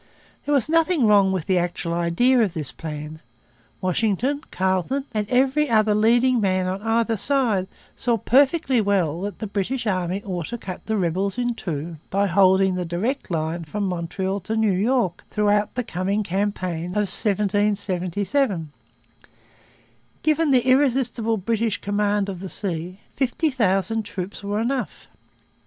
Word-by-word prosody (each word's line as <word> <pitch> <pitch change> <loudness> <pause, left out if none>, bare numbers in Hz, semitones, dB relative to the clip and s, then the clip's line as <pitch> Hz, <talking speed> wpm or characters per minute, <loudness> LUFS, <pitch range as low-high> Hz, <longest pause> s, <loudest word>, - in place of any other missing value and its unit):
There 290 - +2
was 270 -3 +2
nothing 330 -3 +2
wrong 200 -2 +5
with 185 -4 -2
the 185 -2 +2
actual 175 -1 -2
idea 175 +10 +2
of 200 -6 +1
this 150 -5 -1
plan. 155 -1 -7 0.6
Washington, 225 - 0
Carleton, 190 +9 -1
and 210 -2 -2
every 270 +3 +2
other 215 -2 +3
leading 235 +3 +3
man 185 -2 +1
on 185 +2 -3
either 225 +1 +1
side 220 -5 +2 0.3
saw 235 -1 0
perfectly 265 - +3
well 180 -6 0
that 205 +1 -4
the 220 - -5
British 215 +5 -2
army 185 -1 -1
ought 180 -5 -4
to 240 - -5
cut 185 -5 -8
the 220 -1 0
rebels 190 +3 -1
in 245 -1 0
two 165 -5 -5
by 200 +1 +1
holding 190 0 +4
the 180 0 -2
direct 195 +11 -2
line 165 0 -2
from 200 +7 -4
Montreal 185 +2 -2
to 210 +4 -4
New 220 -3 +2
York 200 -2 0
throughout 210 -1 +1
the 250 - -1
coming 195 +1 -1
campaign 185 -3 -2
of 205 +4 -1
1777. 200 - 0 1.5
Given 310 0 +2
the 255 -3 +3
irresistible 255 -4 +2
British 225 +1 -1
command 205 0 0
of 190 -3 -5
the 190 0 -7
sea, 180 0 -4
fifty 280 +4 0
thousand 215 -2 +1
troops 200 -2 -6
were 205 +1 -2
enough. 250 +3 -3
205 Hz, 150 wpm, -23 LUFS, 185-235 Hz, 1.5 s, wrong